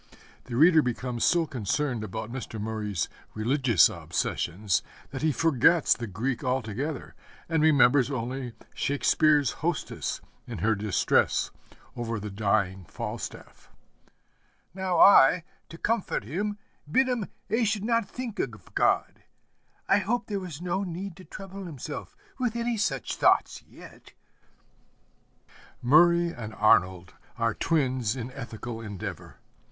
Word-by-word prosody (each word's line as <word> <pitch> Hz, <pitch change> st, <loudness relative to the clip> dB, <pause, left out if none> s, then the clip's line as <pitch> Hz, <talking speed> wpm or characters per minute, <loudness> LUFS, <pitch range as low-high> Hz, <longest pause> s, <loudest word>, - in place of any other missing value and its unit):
The 120 Hz, -, -6 dB
reader 160 Hz, +4 st, +6 dB
becomes 125 Hz, -2 st, -2 dB
so 170 Hz, -2 st, +3 dB
concerned 125 Hz, -1 st, -2 dB
about 110 Hz, +2 st, -5 dB
Mr. 120 Hz, -3 st, -6 dB
Murray's 105 Hz, -6 st, -2 dB, 0.3 s
religious 115 Hz, -, +4 dB
obsessions 95 Hz, +2 st, -1 dB, 0.3 s
that -, -, -5 dB
he 155 Hz, 0 st, +2 dB
forgets 165 Hz, +2 st, +4 dB
the 120 Hz, -, -5 dB
Greek 115 Hz, +6 st, -3 dB
altogether 130 Hz, +3 st, -3 dB, 0.3 s
and 160 Hz, -2 st, +1 dB
remembers 140 Hz, -4 st, +5 dB
only 125 Hz, -1 st, -4 dB, 0.2 s
Shakespeare's 145 Hz, 0 st, +2 dB
hostess 165 Hz, -1 st, -2 dB, 0.3 s
in -, -, -6 dB
her 110 Hz, +6 st, +2 dB
distress 105 Hz, -2 st, +1 dB, 0.4 s
over 115 Hz, -2 st, -3 dB
the 105 Hz, 0 st, -6 dB
dying 100 Hz, -2 st, 0 dB
Falstaff: -, -, -7 dB, 1.0 s
'Now 185 Hz, -2 st, -1 dB
I, 180 Hz, -3 st, +7 dB, 0.3 s
to 165 Hz, -, -10 dB
comfort 225 Hz, -, -1 dB
him, 205 Hz, -, -3 dB, 0.3 s
bid 260 Hz, +9 st, +4 dB
him 245 Hz, -6 st, -1 dB, 0.2 s
'a 230 Hz, +2 st, +2 dB
should 210 Hz, -1 st, 0 dB
not 230 Hz, -3 st, +1 dB
think 250 Hz, -4 st, -6 dB
of 110 Hz, -7 st, -5 dB
God, -, -, +1 dB, 0.7 s
I 200 Hz, -, +4 dB
hoped 235 Hz, +4 st, -2 dB
there 200 Hz, -1 st, -1 dB
was 175 Hz, -3 st, -7 dB
no 180 Hz, +2 st, -1 dB
need 185 Hz, 0 st, -5 dB
to 185 Hz, -, -13 dB
trouble 195 Hz, -1 st, -9 dB
himself 150 Hz, -3 st, -7 dB, 0.2 s
with 245 Hz, -3 st, 0 dB
any 235 Hz, 0 st, -1 dB
such 140 Hz, -, -2 dB
thoughts -, -, +3 dB
yet.' -, -, -15 dB, 1.7 s
Murray 170 Hz, +6 st, +5 dB
and 110 Hz, -2 st, -7 dB
Arnold 95 Hz, -4 st, +3 dB, 0.2 s
are 115 Hz, -2 st, +1 dB
twins 130 Hz, -8 st, 0 dB
in 125 Hz, 0 st, -5 dB
ethical 115 Hz, -1 st, -7 dB
endeavor. 105 Hz, -4 st, -7 dB
135 Hz, 125 wpm, -27 LUFS, 110-175 Hz, 1.7 s, I